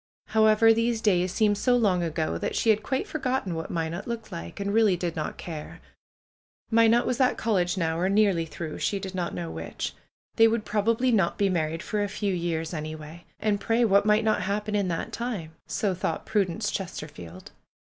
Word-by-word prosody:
However, 220 +1 +5
these 230 0 +1
days 185 -4 +2
seemed 205 0 +2
so 245 +1 +3
long 195 -6 +2
ago 160 -1 -1
that - - -3
she 225 - +4
had 215 0 +1
quite 265 +4 -1
forgotten 260 - -2
what 160 0 -4
Minot 165 +3 -3
looked 235 -2 -5
like, 170 +3 -7
and 200 0 -2
really 215 -4 +4
did 170 -1 -3
not 155 - -4
care. 155 -3 -7 0.9
Minot 230 +1 +5
was 250 - -1
at 255 - +3
college 190 -4 +1
now, 165 -2 0
or 185 +2 +1
nearly 195 -5 +3
through, 155 0 -6
she 200 - 0
did 190 -1 -6
not 180 - -3
know 85 -2 -4
which. 80 0 -5 0.4
They 225 - +7
would 225 -1 0
probably 225 +4 +1
not 195 -7 +2
be 200 -1 +2
married 165 -2 -1
for 210 -1 -2
a - - 0
few 200 0 -2
years 170 -1 -2
anyway. 155 +1 -7
And 210 -2 0
pray, 230 +3 +2
what 200 0 +4
might 210 +1 +4
not 220 -1 +2
happen 210 +3 -2
in 200 -2 +1
that 165 -2 -3
time? 220 -10 -4 0.2
So 200 -3 0
thought 180 - -3
Prudence 205 0 0
Chester 180 -5 -4
field. 90 - -11
200 Hz, 195 wpm, -26 LUFS, 170-220 Hz, 0.9 s, They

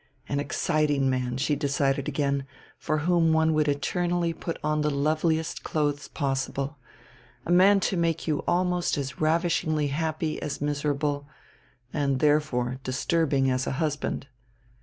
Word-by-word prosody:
An 140 - -1
exciting 145 -2 +1
man, 125 -1 -1
she 145 +3 +1
decided 140 -1 0
again, 140 -2 -1 0.3
for 155 -1 -1
whom 170 -2 +3
one 160 0 +3
would 155 -1 +2
eternally 170 +4 0
put 165 0 -5
on 150 0 +1
the 150 - +1
loveliest 155 +3 0
clothes 145 -2 -1
possible; 140 0 -2 0.7
a - - -2
man 195 +3 +6
to 190 - 0
make 165 -2 0
you 150 -2 +1
almost 180 -1 +1
as 140 +1 -4
ravishingly 155 -2 +1
happy 155 +1 -2
as 150 -2 -4
miserable, 145 0 -1 0.7
and, 140 -3 0
therefore, 135 -4 +1
disturbing 135 0 +1
as 130 0 -1
a - - -1
husband. 145 -1 -2
150 Hz, 140 wpm, -26 LUFS, 140-160 Hz, 0.7 s, man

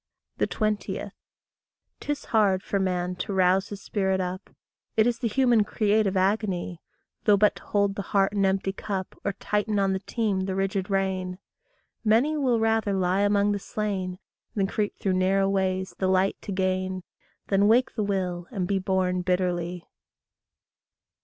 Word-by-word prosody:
20. 215 -1 -1 0.9
'Tis 290 -1 -3
hard 200 -4 +2
for 200 - -1
man 180 -1 -1
to 190 +3 -4
rouse 190 +1 +3
his 200 -1 -8
spirit 190 -2 0
up 185 +1 -4 0.5
It 220 - +5
is 240 -1 +1
the 235 - 0
human 240 -1 +3
creative 210 -2 +1
agony, 185 -3 0 0.4
Though 205 -1 +6
but 210 +1 +3
to - - -13
hold 200 -1 +1
the 200 - -4
heart 195 0 +1
an 200 -1 +1
empty 195 0 +1
cup, 195 -2 -4
Or - - -1
tighten 210 +1 -1
on 195 -1 +2
the 190 - -1
team 200 -2 -1
the 190 - -2
rigid 195 0 -1
rein. 190 -2 -1 0.7
Many 235 +8 +3
will 255 -6 +2
rather 225 -2 +1
lie 190 0 +1
among 205 0 +3
the 205 - -1
slain 195 -3 -3 0.4
Than 200 -2 +2
creep 205 +1 -2
through 190 - 0
narrow 190 +1 +2
ways 190 -1 0
the 190 - +1
light 190 +1 +2
to - - -6
gain 185 -1 -1 0.5
Than 200 +1 +4
wake 240 +4 +3
the 220 - -2
will, 185 -3 -2
and 190 -7 -2
be 195 0 +1
born 185 -1 0
bitterly. 180 -1 -1
195 Hz, 160 wpm, -26 LUFS, 185-210 Hz, 0.9 s, Though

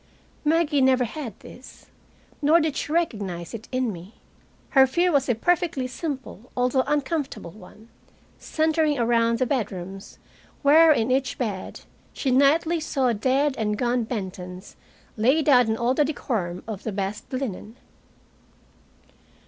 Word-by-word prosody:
Maggie 305 -2 +2
never 260 -1 +4
had 240 -2 -6
this, 255 - -14 0.6
nor 305 +3 +5
did 310 -3 -1
she 295 - -4
recognize 200 - -2
it 230 -1 -8
in 255 -4 -1
me. 180 +5 -12 0.5
Her 265 -1 +6
fear 350 +7 +1
was 275 -3 +1
a 245 - +3
perfectly 340 - 0
simple 255 - -6
although 250 +1 +2
uncomfortable 290 - -2
one, 215 +3 -15 0.5
centering 315 -1 +1
around 230 -1 +2
the 255 - +1
bedrooms 195 -7 -4 0.5
where, 315 +3 +7
in 245 -4 +2
each 260 0 0
bed, 205 -7 -4 0.3
she 265 - -1
nightly 310 +6 +3
saw 270 -5 0
dead 265 +6 +1
and 210 -1 -1
gone 245 0 0
Bentons 185 -4 -6 0.4
laid 270 +8 +2
out 250 -5 +6
in 220 0 0
all 235 +2 +1
the 300 - +3
decorum 210 - -3
of 215 -4 -5
the 220 - -4
best 200 +2 -4
linen. 245 -4 -5
255 Hz, 140 wpm, -24 LUFS, 220-290 Hz, 0.6 s, where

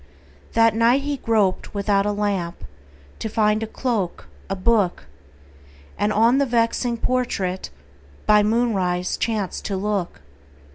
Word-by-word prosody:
That 225 -1 +4
night 235 +4 +3
he 290 0 -2
groped 210 -6 0
without 200 0 +1
a - - +1
lamp 200 -4 -2 0.6
To 220 - -3
find 210 0 +2
a 225 - -3
cloak, 220 -7 -3 0.2
a 195 - -1
book, 195 - +1 0.9
And 205 +1 0
on 230 +5 +4
the 280 - +3
vexing 235 0 +1
portrait 210 -7 -1 0.6
By 210 0 +5
moonrise 205 -5 0
chanced 215 -5 -2
to 195 - -2
look. 195 - -2
210 Hz, 130 wpm, -22 LUFS, 195-230 Hz, 0.9 s, By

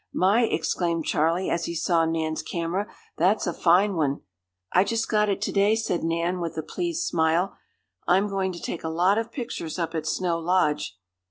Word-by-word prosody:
"My!" 205 +6 +3
exclaimed 165 -2 -1
Charley, 165 +4 +1
as 170 -1 0
he 170 - -4
saw 165 0 +2
Nan's 160 -1 -1
camera, 175 +4 -2 0.3
"that's 190 +6 +3
a 175 - -1
fine 185 +5 +3
one!" 145 -4 0 0.5
"I 180 - +5
just 225 +1 -1
got 210 -1 +2
it 200 0 -1
to - - -1
day," 205 +2 +3
said 220 -6 -1
Nan, 170 +2 0
with 170 -2 -4
a 160 - -2
pleased 340 - -3
smile. 165 +3 +1 0.5
"I'm 190 +3 +4
going 195 -2 -1
to 170 - -8
take 170 - -5
a 160 - -2
lot 180 +6 +3
of 230 0 -4
pictures 225 - -5
up 165 -2 -2
at 160 -1 -3
Snow 170 0 0
Lodge." 160 - 0
175 Hz, 190 wpm, -25 LUFS, 165-200 Hz, 0.5 s, I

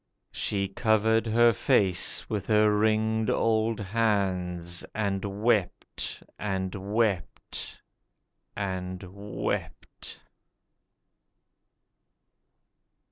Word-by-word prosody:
She 100 -1 -1
covered 110 +2 +2
her 120 +1 +5
face 95 -2 +2
with 100 -3 -3
her 105 -1 +4
ringed 110 +1 +2
old 110 0 +1
hands, 95 -5 -1
and 100 -1 -2
wept 105 -6 -1 0.2
and 95 -2 -2
wept 100 -1 -2 0.8
and 95 -2 -3
wept. 100 +3 -5
105 Hz, 70 wpm, -28 LUFS, 95-110 Hz, 0.8 s, her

